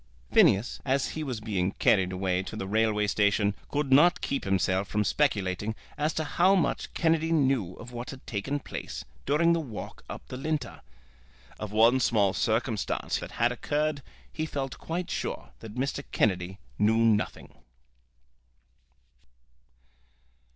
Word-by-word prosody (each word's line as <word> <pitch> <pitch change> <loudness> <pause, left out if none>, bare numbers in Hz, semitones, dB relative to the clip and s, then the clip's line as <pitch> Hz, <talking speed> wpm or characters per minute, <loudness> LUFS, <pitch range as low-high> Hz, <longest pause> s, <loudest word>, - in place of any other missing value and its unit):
Phineas, 100 +5 +4
as 135 0 +1
he 155 - -4
was 130 -6 -3
being 100 -4 -1
carried 95 -3 +3
away 95 -1 0
to 95 +3 -7
the 95 - -4
railway 105 +1 +2
station, 100 0 +2 0.2
could 145 -2 0
not 170 +6 +6
keep 140 - -2
himself 95 0 +1
from 105 0 0
speculating 105 -4 0 0.2
as 150 +2 0
to 160 - 0
how 180 +5 +3
much 180 - 0
Kennedy 165 -1 +2
knew 130 - +2
of 120 +1 -11
what 120 0 -6
had 130 - -9
taken 115 +7 -2
place - - -7 0.2
during 165 +4 +4
the 170 - +1
walk 125 -10 -7
up - - -8
the 125 - -5
Linter. 155 +2 -3 0.8
Of 105 -2 -5
one 115 +4 +5
small 105 -6 +3
circumstance 110 -1 -1
that - - -8
had 120 +1 +2
occurred, 145 +4 -1 0.3
he 155 0 -2
felt 135 -3 -4
quite 175 +2 -4
sure - - -4
that 110 -1 -10
Mr. 140 +2 -2
Kennedy 95 -2 0 0.2
knew 110 +2 +4
nothing. 115 -2 +1
115 Hz, 145 wpm, -28 LUFS, 100-145 Hz, 0.8 s, not